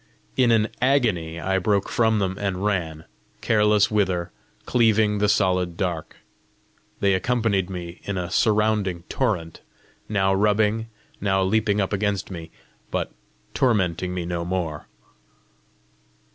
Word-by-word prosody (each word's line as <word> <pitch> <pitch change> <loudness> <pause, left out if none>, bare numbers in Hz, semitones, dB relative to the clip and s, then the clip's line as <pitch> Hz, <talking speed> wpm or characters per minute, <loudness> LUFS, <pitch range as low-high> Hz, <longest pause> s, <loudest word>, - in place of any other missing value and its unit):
In 130 -2 +3
an 110 -1 +3
agony 110 -12 +1
I 95 +2 0
broke 100 +1 +1
from 110 -2 +2
them 95 -2 -1
and 100 -1 -2
ran, 80 -6 -2 0.4
careless 105 -1 +3
whither, 95 -5 0 0.3
cleaving 110 -3 +3
the 105 0 +2
solid 90 -4 +1
dark. 85 -4 -3 0.9
They 100 -1 +3
accompanied 100 -2 0
me 90 -2 -7
in 100 -1 -3
a 90 -1 -3
surrounding 105 -5 +1
torrent, 90 -11 -2 0.5
now 95 -2 +2
rubbing, 105 +2 +2 0.3
now 95 -1 +2
leaping 105 +1 +1
up 95 0 -1
against 100 -1 -1
me, 85 -2 -7 0.4
but - - -2 0.4
tormenting 90 -7 +1
me 90 -2 -3
no 85 0 -3
more. 85 -4 -3
100 Hz, 125 wpm, -24 LUFS, 90-105 Hz, 0.9 s, In